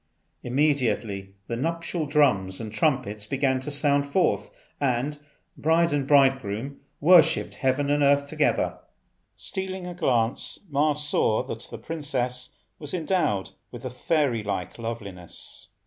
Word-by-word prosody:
Immediately 120 -8 0
the 115 - -3
nuptial 165 +3 -2
drums 100 -11 +2
and 110 -2 -6
trumpets 110 -4 0
began 135 0 +1
to 130 - -4
sound 145 -1 +2
forth, 175 +4 +1 0.3
and 140 +2 0 0.4
bride 165 +1 +2
and 140 -2 0
bridegroom 135 -3 +2 0.2
worshipped 165 0 +5
Heaven 140 +1 0
and 145 0 +2
Earth 140 0 +4
together. 155 +1 0 0.6
Stealing 190 -1 -5
a 180 - -5
glance 125 -9 0
Ma 150 0 +2
saw 145 -7 +1
that 115 - -7
the - - -7
princess 125 -5 -3 0.3
was 150 +2 -5
endowed 160 - 0 0.2
with 120 0 -10
a 130 - -3
fairy 125 -2 0
like 100 -1 -4
loveliness. 100 -7 -8
140 Hz, 130 wpm, -26 LUFS, 115-150 Hz, 0.6 s, worshipped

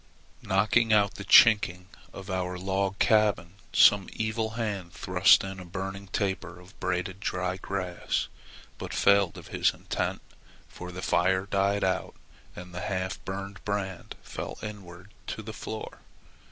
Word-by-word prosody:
"Knocking 110 +4 +2
out 105 -1 +4
the 100 - -8
chinking 100 -5 +6 0.2
of 95 0 -8
our 90 -1 -2
log 95 +1 -1
cabin, 105 -6 +2 0.2
some 100 -2 +5
evil 110 0 -1
hand 100 -7 -3
thrust 90 +3 +4
in 95 -1 -6
a - - -7
burning 95 +2 -6
taper 95 -3 -3
of 90 +3 -17
braided 90 +1 -2
dry 90 -1 -2
grass, 95 -2 -2 0.5
but - - -5
failed 100 -3 +3
of - - -11
his - - +1
intent, - - -3 0.4
for 90 0 -9
the 90 +1 -7
fire 95 +2 +2
died 100 0 +1
out 95 -1 -1 0.4
and 90 0 -10
the 90 - -5
half 95 0 -3
burned 100 +1 -6
brand 95 -3 -4
fell - - -6
inward 100 -2 -9 0.2
to 110 - -5
the 110 +1 -7
floor. 110 0 -7
95 Hz, 145 wpm, -28 LUFS, 90-100 Hz, 0.5 s, chinking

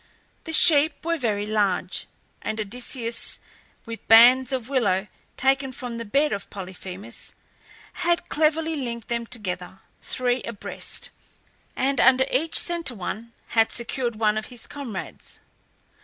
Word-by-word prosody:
The 325 - -5
sheep 315 -1 +6
were 335 0 +1
very 210 -5 0
large, 210 -3 0 0.3
and 220 - -3
Odysseus, 230 +2 -2 0.5
with 230 -1 -8
bands 245 +3 +7
of 255 -3 -2
willow 210 -8 +1 0.3
taken 270 0 +2
from 245 -2 -6
the 230 - -5
bed 280 +6 +2
of 200 0 -5
Polyphemus, 190 +3 -8 0.6
had 345 -1 0
cleverly 315 +1 +1
linked 235 -5 -5
them 235 -1 -2
together 185 -4 -5 0.2
three 250 -1 0
abreast, 230 -3 -4 0.6
and 270 +1 +1
under 260 0 +5
each 315 +6 +2
centre 340 -7 0
one 220 +4 -6 0.2
had 225 -1 +3
secured 235 0 -3
one 215 0 +2
of 215 - -8
his 245 -2 -10
comrades. 250 -9 -8
235 Hz, 130 wpm, -24 LUFS, 215-270 Hz, 0.6 s, bands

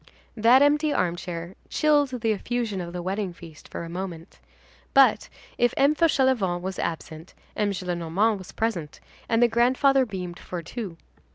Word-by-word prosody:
That 240 +5 +6
empty 295 +1 +3
armchair 175 -3 -2 0.2
chilled 295 -2 +3
the 225 -1 +2
effusion 215 -2 -2
of 170 -1 -6
the 175 0 -5
wedding 190 0 -2
feast 165 -3 -13
for - - -6
a - - -6
moment. 175 -1 -7 0.6
But, 270 -1 +5 0.3
if 240 0 +2
M. 280 +2 +4
Fauchelevent 260 - +2
was 190 0 -4
absent, 160 0 -5 0.2
M. 210 -1 +1
Gillenormand 185 +3 0
was 185 - -10
present, 180 -10 -3 0.3
and 230 +1 +3
the - - +6
grandfather 255 +3 +3
beamed 180 -4 -6
for 175 -2 -6
two. 190 -1 -6
200 Hz, 155 wpm, -25 LUFS, 175-245 Hz, 0.6 s, That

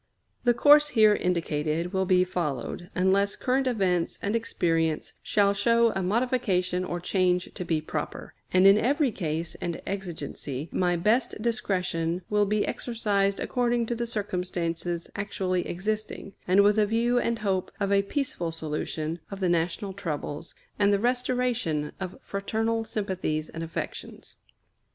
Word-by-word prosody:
The 240 -1 +4
course 295 +4 +7
here 215 -1 +7
indicated 165 -2 -1
will 190 -1 +1
be 180 0 +5
followed, 175 0 -3
unless 195 +2 +2
current 265 +1 0
events 185 -8 +1
and 205 +2 0
experience 165 -8 0
shall 200 -1 +3
show 230 +3 +3
a 190 - -2
modification 190 -4 +1
or 175 -1 -3
change 180 0 +1
to - - -5
be 165 -3 0
proper; 155 - -5 0.2
and 185 +1 +5
in 195 +2 +8
every 275 +3 +2
case 165 -4 -3
and 175 -2 -3
exigency 160 -6 -5
my 175 -1 +1
best 215 +8 +1
discretion 185 -6 -1
will 210 -1 +3
be 210 +1 +1
exercised 200 -4 0
according 240 -1 0
to 235 - -2
the 235 0 -2
circumstances 180 -5 -2
actually 185 -3 -1
existing, 210 +1 -3
and 190 +3 +5
with 205 +1 +4
a 210 - +3
view 235 +3 +2
and 235 -1 0
hope 195 -3 -1
of 200 -1 0
a 200 0 +5
peaceful 200 - -2
solution 160 0 -3
of 195 - -7
the 185 -2 +1
national 175 +4 0
troubles, 165 -4 -5 0.2
and 205 0 +4
the 200 - +4
restoration 245 -9 0
of 185 -2 -5
fraternal 225 +3 -1
sympathies 185 -8 -2
and 165 - -7
affections. 165 - -6
195 Hz, 145 wpm, -27 LUFS, 175-220 Hz, 0.2 s, in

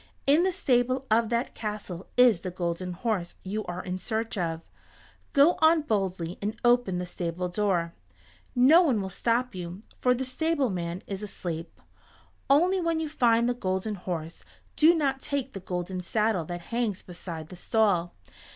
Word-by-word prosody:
In 290 +4 +5
the 375 +1 +2
stable 255 -4 +1
of 225 0 +3
that 235 +1 -1
castle 210 -4 -5
is 245 -7 +6
the 185 - -5
Golden 180 0 -3
Horse 185 -2 -2
you 210 +3 -3
are 175 +1 -5
in 185 0 -4
search 225 +2 -2
of. 165 -4 -2 0.7
Go 290 +4 +5
on 315 0 +5
boldly 190 - -2
and 215 +3 -3
open 240 -6 +3
the 180 - -2
stable 175 0 -3
door. 175 -3 0 0.6
No 275 +8 +7
one 270 -11 +2
will 190 -1 -4
stop 240 +4 0
you, 180 +2 -7 0.2
for 250 0 +3
the 260 +2 -3
stableman 255 - -1
is 195 0 -5
asleep. 170 -5 -6 0.7
Only 355 +7 +4
when 335 -1 0
you 315 -1 -2
find 235 -5 +3
the 245 - +2
Golden 190 -2 -2
Horse 170 -4 -5 0.3
do 325 +3 +6
not 275 -4 0
take 275 -2 -3
the 195 - -5
golden 180 0 -4
saddle 210 -1 0
that 175 +1 -5
hangs 230 -5 -1
beside 170 -3 -7
the - - -9
stall. 180 -3 +1
210 Hz, 165 wpm, -27 LUFS, 180-250 Hz, 0.7 s, No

